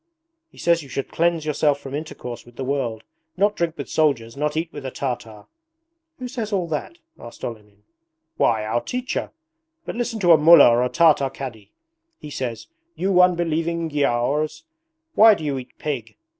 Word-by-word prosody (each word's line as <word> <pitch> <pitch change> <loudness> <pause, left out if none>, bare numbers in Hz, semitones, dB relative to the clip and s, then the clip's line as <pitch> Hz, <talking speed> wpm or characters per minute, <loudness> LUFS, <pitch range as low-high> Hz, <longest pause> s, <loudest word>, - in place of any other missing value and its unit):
He - - -22
says 170 -1 +2
you 140 - -12
should 135 +1 -4
cleanse 170 -1 +1
yourself 150 -1 +1
from 135 -1 -9
intercourse 145 -5 -6
with 120 0 -18
the 135 - -5
world, 125 -5 -2 0.3
not 205 +2 +2
drink 170 -1 -2
with 140 - -5
soldiers, 135 -7 0
not 150 +2 -2
eat 165 +1 -3
with 145 - -7
a 130 - -3
Tartar.' 120 -5 -5 0.7
'Who 255 - -6
says 230 -4 -5
all 185 -4 0
that?' 160 - -4 0.2
asked 120 - -9
Olenin. 105 -3 -9 0.5
'Why, 110 -2 +1
our 115 +2 0
teacher! 250 0 -3 0.6
But - - -4
listen 235 -1 -2
to 175 -2 +5
a 165 - +9
Mullah 160 -3 +8
or 120 +1 +3
a 125 - 0
Tartar 155 -4 +4
Cadi. 115 -7 -8 0.5
He 150 - -10
says, 120 -6 -4 0.3
"You 185 -1 +3
unbelieving 170 -2 +1
Giaours, 145 - 0 0.5
why 220 0 +7
do 165 - -8
you 140 -3 -1
eat 125 - -13
pig?" 135 -7 -5
150 Hz, 175 wpm, -22 LUFS, 125-170 Hz, 0.7 s, a